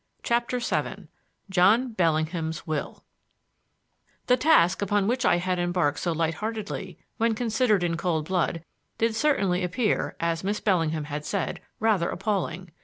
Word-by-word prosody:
CHAPTER 240 +1 0
VII 245 - -3 0.4
JOHN 215 +7 +4
BELLINGHAM'S 160 -2 0
WILL 155 -3 -4 1.2
The 250 - +4
task 250 - +4
upon 200 0 +1
which 250 +2 0
I 175 - +4
had 180 +1 -1
embarked 175 -4 0
so 175 - -1
light 165 0 0
heartedly, 210 -3 -5 0.2
when 225 0 +2
considered 220 -4 +1
in 170 -1 0
cold 170 -3 -1
blood, 175 -3 0 0.3
did 230 0 +1
certainly 200 -9 +1
appear, 210 +5 0
as 165 0 -1
Miss 205 +2 -1
Bellingham 165 -6 +1
had 150 0 -5
said, 195 +2 -2 0.2
rather 210 -6 +2
appalling. 185 -4 -2
185 Hz, 140 wpm, -26 LUFS, 165-220 Hz, 1.2 s, JOHN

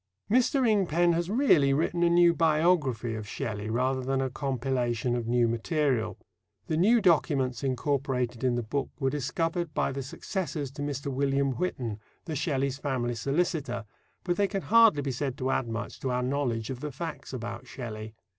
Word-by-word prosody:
Mr. 255 +2 +3
Ingpen 175 -5 +3
has 170 +1 -1
really 175 - +4
written 170 +3 0
a 170 - +5
new 170 0 +5
biography 155 -8 +2
of 110 -2 -5
Shelley 105 -1 -4
rather 130 +3 0
than 135 +1 0
a 130 -1 -1
compilation 125 -3 -1
of 120 -2 -3
new 120 0 +3
material. 115 - 0 0.5
The 155 - -1
new 220 +8 +4
documents 140 - +2
incorporated 130 -2 -1
in 125 -2 +2
the 120 - -1
book 135 +5 -2
were 135 -2 +1
discovered 165 +3 -2
by - - +1
the 135 +1 -4
successors 155 0 -4
to 145 +1 -8
Mr. 140 -1 -3
William 140 0 +1
Whitton, 125 - -3 0.3
the 160 - -4
Shelleys' 140 -2 -1
family 130 -4 -1
solicitor, 135 -1 -1 0.4
but 175 -1 -1
they 200 - +3
can 195 0 -3
hardly 225 -10 +5
be 135 - -1
said 130 +1 -3
to 130 -2 -1
add 125 - 0
much 115 -2 -5
to 130 - -2
our 125 0 0
knowledge 125 -4 -1
of 125 - -5
the 150 +2 -4
facts 160 +5 -6
about 115 -3 -6
Shelley. 110 -3 -7
135 Hz, 175 wpm, -28 LUFS, 120-165 Hz, 0.5 s, a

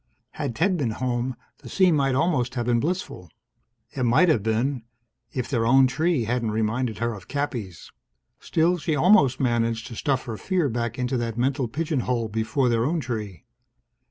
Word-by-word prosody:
Had 140 -6 -4
Ted 180 - +1
been 135 -7 0
home, 125 0 -2 0.2
the - - -11
scene 185 -4 +3
might 135 -2 +1
almost 135 -5 +1
have 120 -2 -1
been 120 -1 +2
blissful. 150 - -3 0.6
It 130 - -5
might 125 +9 +4
have 130 -9 +3
been... 115 +5 0 0.5
if 125 -3 -3
their 120 -4 0
own 135 +2 +6
tree 155 +2 +1
hadn't 115 0 -1
reminded 110 +2 -1
her 115 0 -1
of 100 - -11
Cappy's. 125 - -4 0.5
Still, 170 +2 +1
she'd 155 0 -1
almost 145 - +4
managed 115 -2 0
to 115 - -8
stuff 135 +1 -1
her 115 -3 -5
fear 180 - 0
back 120 0 -3
into 125 +1 -1
that 115 -1 -3
mental 130 +1 0
pigeon 150 +4 -2
hole 120 -2 -1
before 110 +5 0
their 115 -1 +2
own 165 +6 0
tree. 105 - -5
125 Hz, 180 wpm, -24 LUFS, 115-145 Hz, 0.6 s, own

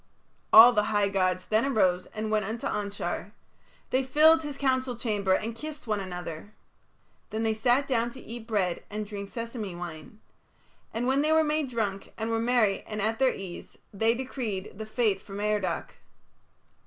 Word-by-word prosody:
All 235 +3 +10
the 210 -2 +2
high 205 -2 +1
gods 185 -2 0
then 220 +2 +2
arose 185 -9 +2
and 215 0 -4
went 215 -1 +2
unto 225 +3 -4
Anshar, 200 -1 -3 0.6
They 260 +1 +2
filled 315 +5 +5
his 295 -3 -6
council 260 -2 0
chamber 205 -5 0
and 220 +4 -1
kissed 305 +5 -7
one 215 -3 -1
another. 180 0 -7 0.7
Then 220 +1 -2
they 220 -1 +2
sat 245 +5 +2
down 235 -3 +1
to 260 - -11
eat 235 -2 -9
bread 190 -6 0
and 210 0 -4
drink 200 -1 -7
sesame 230 -5 -5
wine. 175 +3 -8 0.7
And 235 +2 -2
when 265 +2 +2
they 305 +1 +2
were 320 0 +5
made 300 -2 0
drunk 210 -5 -3
and 225 +1 -2
were 225 - +1
merry 230 -4 +2
and 215 -1 -4
at 220 +2 0
their 265 -1 +4
ease, 185 -3 -9 0.2
they 225 +3 +2
decreed 235 -7 -4
the 220 - -5
fate 215 -4 +1
for 195 - -12
Merodach. 205 -4 -1
220 Hz, 175 wpm, -28 LUFS, 200-245 Hz, 0.7 s, All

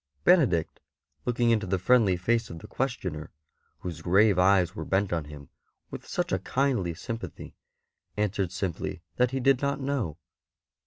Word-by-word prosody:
Benedict, 130 - +3 0.5
looking 120 -1 +2
into 110 -4 +1
the 95 +1 +1
friendly 100 -1 +3
face 115 +6 0
of 85 - -7
the - - -11
questioner, 95 - -3 0.5
w^hose 85 -3 -5
grave 95 +3 +4
eyes 90 -1 +4
were - - -4
bent 95 -1 0
on 80 -3 -1
him 75 -1 -11 0.4
with - - -8
such - - -2
a - - +1
kindly 125 -11 0
sympathy, 115 +6 -7 0.6
answered 100 -3 0
simply 95 -2 -4
that 125 0 +3
he 135 +1 -2
did 135 0 +3
not 140 0 0
know. 135 - -2
100 Hz, 155 wpm, -27 LUFS, 90-125 Hz, 0.6 s, grave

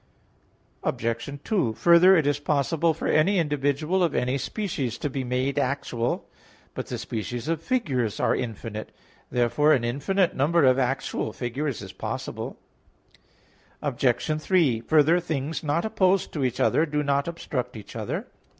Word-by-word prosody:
Obj. 115 +5 -2
2: 180 - +1
Further, 170 - +6
it 160 - +2
is 145 0 +1
possible 150 +3 +1
for 160 - -5
any 190 +6 +3
individual 150 +3 +1
of 165 - +1
any 125 +2 +1
species 140 - -3
to 145 - -3
be 135 -1 -2
made 130 +3 0
actual. 125 -3 -1 0.5
But - - -5
the - - -4
species 115 +3 -4
of 165 -1 -1
figures 140 - -1
are - - +2
infinite. 110 -2 -5 0.4
Therefore 125 +5 +3
an 130 -5 +2
infinite 155 +10 0
number 150 +3 +3
of 130 0 +4
actual 135 +1 -1
figures 130 0 -3
is 95 -1 -9
possible. - - -5 1.3
Obj. 140 +3 0
3: 155 -11 +2
Further, 155 +6 +4
things 155 -3 -3
not 155 +5 0
opposed 195 -3 +1
to 145 - -1
each 125 -2 -1
other 160 - +3
do 150 0 -1
not 140 +1 +1
obstruct 130 -8 -4
each 105 - -11
other. - - -3
140 Hz, 150 wpm, -25 LUFS, 125-165 Hz, 1.3 s, Further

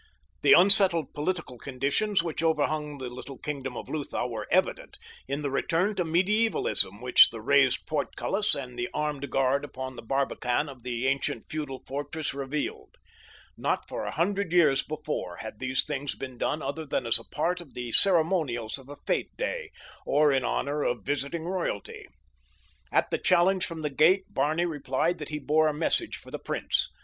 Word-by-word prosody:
The - - +7
unsettled 185 -5 +6
political 150 -5 -3
conditions 140 - 0
which 165 -2 -3
overhung 150 -2 0
the 130 -2 -5
little 125 +2 -8
kingdom 135 -4 -5
of - - -7
Lutha 145 -5 -3
were 110 -3 -5
evident - - 0 0.3
in 140 +2 -3
the 140 - -1
return 170 +8 +1
to 185 - 0
medievalism 175 - +1
which 125 0 +7
the 115 - -8
raised 135 +2 +3
portcullis 160 +7 0
and 125 -3 -7
the 120 - -2
armed 150 -2 -2
guard 135 +1 +2
upon 130 -2 -6
the - - -8
barbican 135 +2 0
of 130 -3 -11
the 120 0 -3
ancient 135 -3 0
feudal 145 -4 -4
fortress 145 +3 -4
revealed. 140 +2 -4 0.6
Not - - -1
for - - -4
a - - -3
hundred 195 +3 0
years 150 -6 +5
before 150 - -4
had 110 +1 -8
these 130 0 +1
things 140 +1 -3
been 130 -2 -8
done 155 0 -1
other 145 +4 -3
than 135 - -1
as 115 0 +1
a - - -12
part 175 +8 -1
of 155 -6 -15
the 120 -1 -4
ceremonials 155 - +2
of 135 +1 -15
a 145 - -9
fete - - -1
day, - - -3 0.3
or 150 +1 +3
in 135 -1 +2
honor 145 +4 -1
of 120 -7 -1
visiting 145 +3 -2
royalty. 420 - -4 0.8
At - - +2
the - - 0
challenge 185 0 +3
from 165 -1 -6
the 150 -1 -2
gate 185 +7 +3
Barney 155 +5 +1
replied 150 +1 -1
that 150 - -6
he 150 - -3
bore 155 +2 +2
a 155 - +1
message 170 - +2
for - - -14
the - - -5
prince. - - 0
145 Hz, 180 wpm, -28 LUFS, 130-165 Hz, 0.8 s, The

